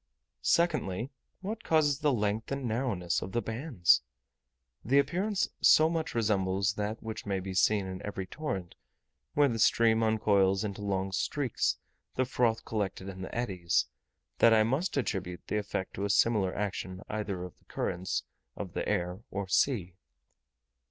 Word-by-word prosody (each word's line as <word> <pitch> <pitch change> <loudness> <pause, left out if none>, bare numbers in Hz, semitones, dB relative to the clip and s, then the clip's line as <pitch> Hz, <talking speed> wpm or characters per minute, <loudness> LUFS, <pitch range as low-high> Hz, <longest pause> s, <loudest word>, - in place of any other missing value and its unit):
Secondly, 135 - +1 0.3
what 215 +4 -5
causes 150 -3 +3
the 150 -1 +2
length 105 -1 -1
and 140 -1 -2
narrowness 110 -7 -1
of 95 - -6
the 120 - +1
bands? 110 - +2 0.8
The 135 +4 +3
appearance 185 +9 +1
so 155 +1 +6
much 160 -6 -2
resembles 100 -3 +1
that 105 +1 -3
which 110 -2 -6
may 100 -1 0
be 95 0 -5
seen 100 +2 +3
in 95 0 -6
every 100 -2 -4
torrent, 95 - -4 0.6
where 145 -1 +5
the 115 -4 -2
stream 115 +1 +4
uncoils 100 -3 +3
into 105 -1 -4
long 95 -1 -1
streaks 125 +6 0 0.4
the 130 - +2
froth 120 -3 +1
collected 100 -3 -3
in 95 -1 -8
the 95 - -6
eddies, 95 -8 +1 0.5
that 115 -1 +7
I 110 - +5
must 140 - 0
attribute 90 -8 -2
the 105 - -1
effect 100 -2 -4
to 100 - -3
a - - -2
similar 100 -2 +3
action 95 -2 -3
either 100 -4 -3
of 90 - -10
the - - -32
currents 90 +1 -2 0.3
of - - -6
the - - -2
air 90 +3 -1
or 100 0 -4
sea. 95 -2 +1
105 Hz, 160 wpm, -30 LUFS, 95-125 Hz, 0.8 s, that